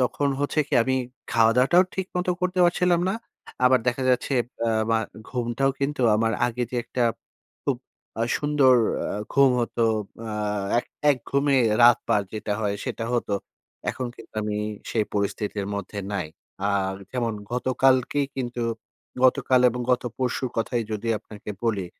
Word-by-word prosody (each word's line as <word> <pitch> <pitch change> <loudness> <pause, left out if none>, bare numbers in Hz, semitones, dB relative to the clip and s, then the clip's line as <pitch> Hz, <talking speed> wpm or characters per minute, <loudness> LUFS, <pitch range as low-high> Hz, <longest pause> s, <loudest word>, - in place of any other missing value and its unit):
তখন 140 +3 +1
হচ্ছে 145 +2 -1
কি? - - -20
আমি 130 - +1 0.4
খাওয়া-দাওয়াটাও 125 +10 +5
ঠিক 190 -1 -2
মতো 180 0 0
করতে 180 0 -1
পারছিলাম 175 0 +3
না। - - -1 0.5
আবার 130 0 +6
দেখা 130 +2 -1
যাচ্ছে 125 +2 +1 0.3
অ্যা 115 -1 +1 0.2
মা 115 - +4 0.3
ঘুমটাও 125 +2 0
কিন্তু 140 -1 -1
আমার 115 +1 +1
আগে 120 +1 -2
যে 125 - -3
একটা 125 - -2 0.6
খুব - - +1 0.4
আ - - +2 0.2
সুন্দর 145 -3 +4 0.4
আ - - -3 0.2
ঘুম 140 -1 +6
হতো। 115 0 0 0.4
আ - - -4 0.5
এক - - -3 0.2
এক 135 - +1
ঘুমে 140 0 +3 0.3
রাত 120 -1 +8
পার 105 - +3
যেটা 105 -1 -3
হয় 100 -1 0
সেটা 115 - -3
হতো। 110 -4 0 0.6
এখন 130 - -4
কিন্তু - - -14
আমি 105 0 -2 0.3
সেই 110 -2 +1
পরিস্থিতির 100 0 -2
মধ্যে 100 +1 -5
নাই। 95 -6 -1 0.4
আর 95 -1 0 0.2
যেমন 120 -3 -1 0.2
গতকালকেই 130 +2 +2
কিন্তু 120 -2 -3 0.6
গতকাল 130 0 +4
এবং 125 +1 -4
গত 125 - +1 0.2
পরশুর 130 0 -1
কথাই 115 +1 0
যদি 110 +2 -3
আপনাকে 105 0 -10
বলি, 100 -5 0
125 Hz, 155 wpm, -25 LUFS, 110-135 Hz, 0.6 s, রাত